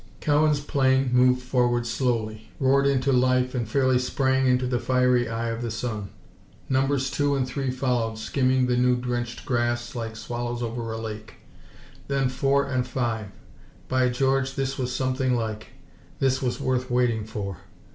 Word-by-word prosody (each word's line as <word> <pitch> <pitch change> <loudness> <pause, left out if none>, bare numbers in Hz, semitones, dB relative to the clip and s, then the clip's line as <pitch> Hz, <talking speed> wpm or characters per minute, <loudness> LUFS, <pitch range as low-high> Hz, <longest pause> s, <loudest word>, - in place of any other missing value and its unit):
Cowan's 150 0 +2
plane 135 -3 +2
moved 125 0 +4
forward 120 -1 +1
slowly, 110 -3 -2
roared 140 +1 +3
into 135 0 +2
life 130 0 +2
and 120 -4 -2
fairly 130 0 +3
sprang 130 +1 +1
into 125 0 +2
the 125 -1 0
fiery 125 -1 +2
eye 115 +1 -2
of 115 +1 -4
the 120 - -2
sun. 110 -3 -4 0.6
Numbers 135 0 +1
two 145 -1 +1
and 130 -2 0
three 135 +1 -2
followed, 125 -3 -1
skimming 130 +2 +1
the 125 0 +1
dew 125 0 +3
drenched 120 -1 -3
grass 120 -1 -1
like 115 -2 -5
swallows 120 +1 -4
over 115 0 -4
a 110 - -4
lake. 110 -1 -7 0.7
Then 135 -2 +1
four 135 +2 +1
and 130 -1 -1
five. 115 -5 -2 0.6
By 130 -1 +2
George, 135 +1 0
this 135 0 -1
was 125 -1 -2
something 130 0 0
like! 110 -2 -3 0.5
This 130 -1 +1
was 125 -2 -1
worth 130 0 -1
waiting 120 -3 +1
for! 100 -4 -5
125 Hz, 160 wpm, -25 LUFS, 120-130 Hz, 0.7 s, moved